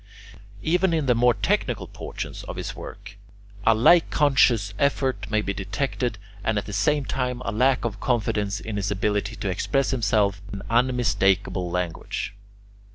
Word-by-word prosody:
Even 175 +1 +2
in 155 -3 0
the 125 - +4
more 120 0 +3
technical 100 - 0
portions - - -7
of - - -6
his - - -5
work, - - -10 0.5
a 115 - +6
like 160 +10 +5
conscious 125 -8 +3
effort 135 -2 0
may 110 -1 +1
be 100 - -2
detected, 120 +4 -2 0.3
and, 110 -1 0
at 105 - -1
the 105 - -7
same 140 +8 +1
time, 125 -2 -2
a - - -1
lack 125 +4 +2
of 110 -2 -3
confidence 105 -4 0
in 110 -2 -5
his 100 -1 -1
ability 105 +2 -1
to 100 - -4
express 135 +9 0
himself 105 -6 +1
in 100 0 -6
unmistakable 100 -7 +2
language. 90 +2 -3
110 Hz, 160 wpm, -24 LUFS, 100-130 Hz, 0.5 s, a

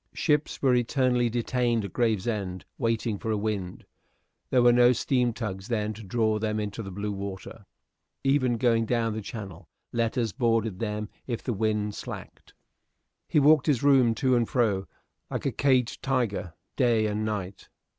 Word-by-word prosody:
Ships 150 -2 0
were 130 -2 +4
eternally 125 0 +2
detained 120 -1 0
at 100 - -8
Gravesend 105 -5 -1
waiting 115 -3 0
for 115 - -4
a 110 - +1
wind; 100 -4 -3 0.6
there 125 -2 +3
were 120 0 +6
no 120 +1 +6
steam 125 0 +1
tugs 105 -4 -5
then 110 -3 -1
to 110 - -10
draw 110 +1 0
them 110 0 -1
into 105 +1 -4
blue 100 +2 -4
water. 100 -1 -7 0.6
Even 130 -3 +2
going 115 -2 +2
down 115 -2 0
the 110 - -4
Channel, 95 - -8 0.2
letters 115 -2 0
boarded 115 -4 0
them 105 -1 -3 0.2
if 120 -3 -3
the 125 - -1
wind 105 0 0
slacked. - - -9 0.7
He - - +3
walked 150 0 +5
his 140 -5 +2
room 130 -5 +5
to 130 +2 +2
and 120 -2 +1
fro, 105 -6 +1 0.4
like - - -4
a - - +1
caged 130 -3 +1
tiger, 120 -10 -1 0.2
day 120 -4 +3
and 105 0 -1
night. 100 -3 -4
115 Hz, 160 wpm, -27 LUFS, 105-125 Hz, 0.7 s, were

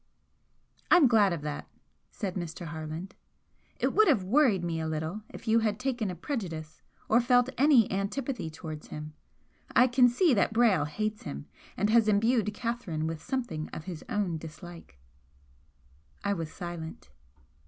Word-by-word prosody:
"I'm 345 -6 +7
glad 215 -5 +4
of 165 -4 -3
that," 150 -1 -5 0.4
said 195 -5 -4
Mr. 175 -1 -5
Harland 160 +4 -6 0.7
"It - - +1
would 435 0 +5
have 255 - +3
worried 215 - +3
me 165 -1 -2
a 160 - -2
little 160 +6 -3
if - - -11
you 225 +1 +5
had 215 -2 0
taken 250 -5 -1
a 180 - -4
prejudice 165 - -5 0.3
or 230 +3 +4
felt 245 +1 +3
any 270 -4 +5
antipathy 200 - -2
towards 155 -1 -8
him. 150 0 -7 0.6
I 250 - +7
can 250 0 +5
see 295 +5 +3
that 200 -1 +2
Brayle 215 -10 +3
hates 215 +7 -3
him 70 +1 -7 0.3
and 205 +2 +1
has 230 -1 +5
imbued 215 +1 +2
Catherine 215 -9 -3
with 160 -1 -4
something 240 - -3
of 160 - -6
his 175 -3 -7
own 200 -8 -1
dislike." 165 - -11 1.3
I 200 - +1
was 165 -4 -4
silent. 165 - -7
200 Hz, 155 wpm, -29 LUFS, 160-235 Hz, 1.3 s, I'm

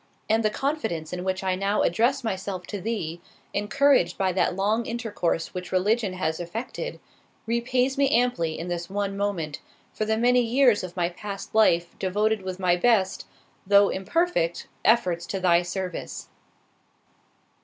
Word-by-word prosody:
And 225 +1 +2
the 215 - +3
confidence 220 - -2
in 180 0 -4
which 190 +1 -2
I 190 -1 +1
now 195 +3 +1
address 235 +10 +2
myself 190 -3 -3
to 205 -3 -6
Thee, 175 -7 -3 0.3
encouraged 210 - +2
by 190 -1 +1
that 180 0 +1
long 210 +4 0
intercourse 225 -8 -2
which 180 -1 -6
religion 200 +2 +1
has 160 -3 -2
effected, 230 - -5 0.5
repays 250 +4 0
me 275 -1 +4
amply 235 - +1
in 170 - -5
this 175 0 -4
one 200 0 -2
moment, 190 -7 -2 0.3
for 215 - -2
the 220 0 +1
many 245 +2 +4
years 240 -2 +3
of 180 0 -8
my 175 -1 +1
past 195 +2 -7
life 170 -6 +3
devoted 210 +3 +1
with 185 -1 -5
my 180 -2 +3
best, 190 -1 +2 0.4
though 200 0 +6
imperfect, 190 - 0 0.2
efforts 180 -7 +2
to 195 - -3
thy 175 -2 +4
service." 180 0 -5
200 Hz, 155 wpm, -25 LUFS, 180-230 Hz, 0.5 s, though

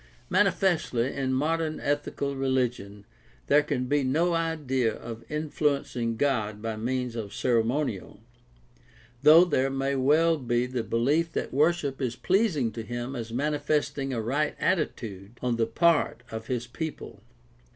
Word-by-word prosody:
Manifestly, 180 - +2
in 135 -2 -1
modern 155 +4 0
ethical 145 -1 -2
religion 125 -7 -1 0.4
there 145 +1 +5
can 140 -4 -2
be 145 +2 +1
no 160 +7 +1
idea 150 -8 0
of 115 0 -8
influencing 145 -6 -1
God 110 -6 0
by 110 0 -3
means 125 +2 -2
of 105 -3 -5
ceremonial, 120 -3 0 1.0
though 165 +4 +8
there 135 -6 +1
may 135 +1 -1
well 155 +5 +3
be 120 -1 0
the 125 -2 -3
belief 145 +10 +1
that - - -3
worship 145 -1 +1
is 120 -3 -1
pleasing 170 - +1
to 115 - -6
him 120 +4 -5
as 115 -2 -5
mani 145 +5 -1
festing 145 -2 -1
a 120 - -2
right 140 +7 -1
attitude 115 - -2
on 125 -2 -1
the 115 -1 +1
part 155 +1 +2
of 110 0 -6
his 125 -2 -2
people. 130 - -7
135 Hz, 140 wpm, -27 LUFS, 120-150 Hz, 1.0 s, though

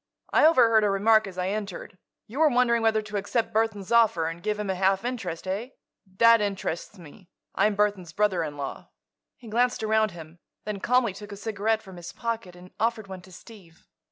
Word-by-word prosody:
"I - - +6
overheard 230 -8 +5
a 205 - +3
remark 215 +2 +3
as 185 -2 -10
I 180 +1 -1
entered. 200 -2 -6 0.3
You 250 +7 -8
were 315 -1 +5
wondering 240 -2 +2
whether 220 -1 +2
to 210 -1 -5
accept 225 +3 -2
Burthon's 215 -3 -1
offer 225 -8 +4
and 165 +1 -5
give 210 +3 -2
him 205 -2 -2
a - - 0
half 190 +3 +1
interest. 200 -10 -4
Eh? 200 +6 -3 0.5
That 230 0 +6
interests 195 -1 -3
me; 175 +2 -15 0.2
I'm 210 -1 +2
Burthon's 200 -4 0
brother 190 -3 +1
in 145 -2 -6
law." 140 -1 -6 0.5
He 240 - -14
glanced 240 +1 0
around 220 0 +2
him, 165 -2 -12 0.3
then 210 -1 -4
calmly 245 -2 +2
took 205 +1 -11
a 200 - -7
cigarette 220 +1 -1
from 190 -3 -12
his 175 0 -9
pocket 230 -6 -4
and 180 +1 -14
offered 225 -1 0
one 190 -2 -9
to 185 - -17
Steve. 180 -3 -15
210 Hz, 200 wpm, -26 LUFS, 185-225 Hz, 0.5 s, I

